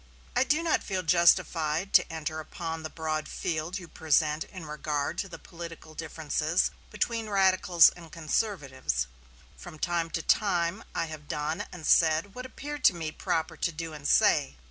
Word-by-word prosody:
I - - +4
do 305 +4 +1
not 330 - +1
feel 190 -2 -2
justified 170 0 +3
to - - +5
enter 160 0 -4
upon 160 +1 -5
the 155 - -5
broad 155 -1 -3
field 165 +3 -3
you 180 -3 -9
present 155 -1 +1
in 185 -4 -10
regard 150 +1 -2
to 195 - -3
the 175 - -8
political 165 -2 -10
differences 160 +1 -1 0.2
between 225 +1 -2
radicals 185 -3 +5
and 165 -2 -13
conservatives. 145 - -1 0.5
From 175 -3 -10
time 170 +1 -1
to 160 - -6
time 180 0 +1
I 165 - 0
have 155 -2 -9
done 150 +2 -2
and 170 -3 -8
said 165 +4 +4
what 250 +2 -7
appeared 290 +2 -7
to 185 - +7
me 160 -2 -4
proper 160 +1 -2
to 170 - 0
do 165 0 -6
and 145 -2 -5
say. 65 - +4
165 Hz, 165 wpm, -28 LUFS, 155-185 Hz, 0.5 s, to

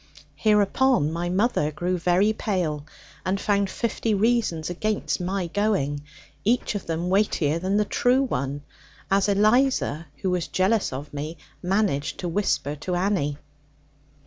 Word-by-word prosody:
Hereupon 210 - +3
my 175 +1 -2
mother 185 -5 +1
grew 180 +4 -2
very 180 +5 +3
pale, 165 -9 -2 0.4
and 190 +1 0
found 200 -1 +1
fifty 225 0 -1
reasons 210 -7 +1
against 210 +1 -1
my 185 +1 -1
going, 170 -7 0 0.4
each 235 +2 +1
of 205 - -5
them 170 +2 -2
weightier 170 -6 +2
than 190 +3 0
the 210 - +2
true 250 +6 +2
one, 140 - -2 0.5
as 195 +1 +3
Eliza 210 - +2 0.2
(who 190 - +1
was 180 -2 -1
jealous 195 +3 +1
of 140 +3 -7
me) 150 +3 -5 0.2
managed 185 -6 0
to 180 - -2
whisper 165 -5 0
to 180 +5 -3
Annie. 175 -6 0
185 Hz, 140 wpm, -25 LUFS, 160-210 Hz, 0.5 s, Hereupon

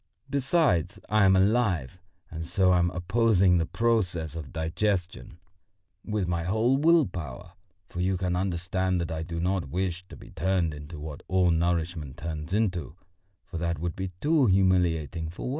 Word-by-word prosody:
Besides, 130 - +1
I 105 -1 +4
am 95 0 +5
alive, 95 - +1 0.3
and 80 0 -5
so 90 +2 +2
am 90 -1 +3
opposing 95 0 +3
the 80 - -1
process 90 -10 0
of 75 -6 -7
digestion 90 +1 -2 0.7
with 105 -4 -2
my 85 -1 -1
whole 110 +9 +2
will 165 +1 +5
power; 85 - -7 0.4
for 90 - -5
you 95 +1 +1
can 90 -1 -1
understand 95 0 -1
that 85 - -3
I 80 -1 -3
do 85 0 -5
not 90 -4 -1
wish 90 +2 -2
to - - -11
be - - -14
turned 90 -1 0
into 75 +2 -9
what 75 -1 -7
all 90 -1 +3
nourishment 85 -3 -1
turns 80 0 -5
into, 95 -7 -1 0.5
for 85 - -6
that 85 0 -1
would 85 +2 -3
be 95 -1 -4
too 150 -3 +3
humiliating 90 -5 +2
for 85 - -9
me. - - -3
90 Hz, 165 wpm, -27 LUFS, 85-95 Hz, 0.7 s, am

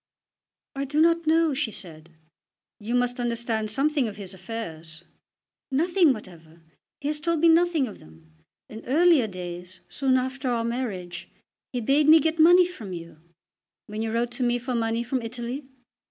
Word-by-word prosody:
"I 275 0 -2
do 290 +3 -1
not 335 0 +3
know," 325 -1 +3
she 265 -3 -1
said. 165 -6 -9 0.7
"You 225 +3 -3
must 245 0 0
understand 235 -2 -2
something 275 +3 +1
of 210 -1 -7
his 195 -2 -8
affairs." 170 -6 -8 0.7
"Nothing 335 +3 +3
whatever. 170 -7 -9 0.4
He 285 - -2
has 300 0 -2
told 335 +1 0
me 335 +2 +5
nothing 330 -3 +3
of 210 - -10
them. 80 - -19 0.3
In 220 +1 -10
earlier 305 -2 +4
days, 180 -1 -8
soon 265 -2 +1
after 260 +1 -2
our 235 -2 0
marriage, 195 -8 -4 0.4
he 245 - -3
bade 280 +6 +3
me 320 +1 +9
get 320 +2 -1
money 350 +3 +7
from 230 - -8
you." 170 -2 -9 0.7
"When 210 +1 -5
you 225 0 -2
wrote 235 +1 -1
to 250 +2 -4
me 240 0 +2
for 250 +1 -4
money 230 0 0
from 250 +1 -2
Italy?" 240 +4 -5
240 Hz, 170 wpm, -25 LUFS, 205-295 Hz, 0.7 s, me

